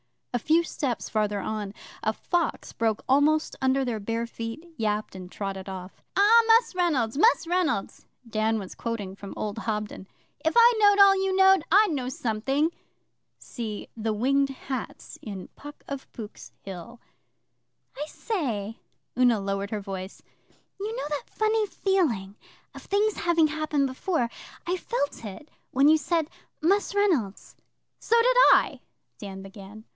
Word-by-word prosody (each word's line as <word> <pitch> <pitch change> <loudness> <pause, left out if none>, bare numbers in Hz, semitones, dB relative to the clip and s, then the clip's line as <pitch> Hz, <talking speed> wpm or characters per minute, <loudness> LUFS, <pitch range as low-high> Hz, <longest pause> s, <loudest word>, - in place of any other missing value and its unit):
A 245 - +1
few 320 +8 +3
steps 270 -6 -3
farther 210 -2 0
on 210 -1 -4 0.3
a 220 - 0
fox 345 +8 -2
broke 225 -2 0
almost 295 +4 +3
under 265 +1 +2
their 240 -4 -2
bare 230 +3 -2
feet, 230 +6 -7
yapped, 215 -2 -1
and 185 -1 -9
trotted 195 -1 -5
off. 185 0 -8
'Ah, 425 +4 +7
Mus' 455 0 +5
Reynolds 285 -10 +1
Mus' 445 +2 +4
Reynolds' 345 - -1 0.2
Dan 220 0 0
was 195 -3 -6
quoting 220 -5 -4
from 200 0 -9
old 210 +1 -3
Hobden, 210 -3 -4 0.4
'if 320 - +1
I 475 +1 +8
knowed 410 -1 +5
all 395 -1 +8
you 385 0 0
knowed, 385 -2 +6
I'd 410 +2 +5
know 265 -5 -2
something.' 265 +6 0 0.7
[See 220 -4 -6
'The 220 -1 -1
Winged 275 +5 +2
Hats' 265 -2 -6
in 195 -4 -7
PUCK 290 0 -11
OF 280 -1 -6
POOK'S 215 -4 -9
HILL.] 195 +5 -9 1.0
I 295 - -4
say,' 230 - -3 0.4
Una 245 -4 +4
lowered 195 0 -2
her 210 -1 -3
voice 195 -1 -7 0.6
'you 430 +3 -3
know - - -3
that 295 -2 -4
funny 435 0 +1
feeling 280 - 0 0.4
of - - -10
things 410 +1 +1
having 335 -2 +3
happened 305 -2 0
before. 260 -1 -1 0.4
I 355 +2 0
felt 285 - -3
it 210 +9 -9 0.2
when 275 +3 +5
you 315 - +6
said 320 +1 0 0.3
"Mus' 400 +5 +2
Reynolds."' 315 - 0 0.4
'So 460 - +1
did - - +3 0.2
I,' - - +2 0.4
Dan 195 -2 -7
began. 200 +2 -11
260 Hz, 150 wpm, -26 LUFS, 210-340 Hz, 1.0 s, I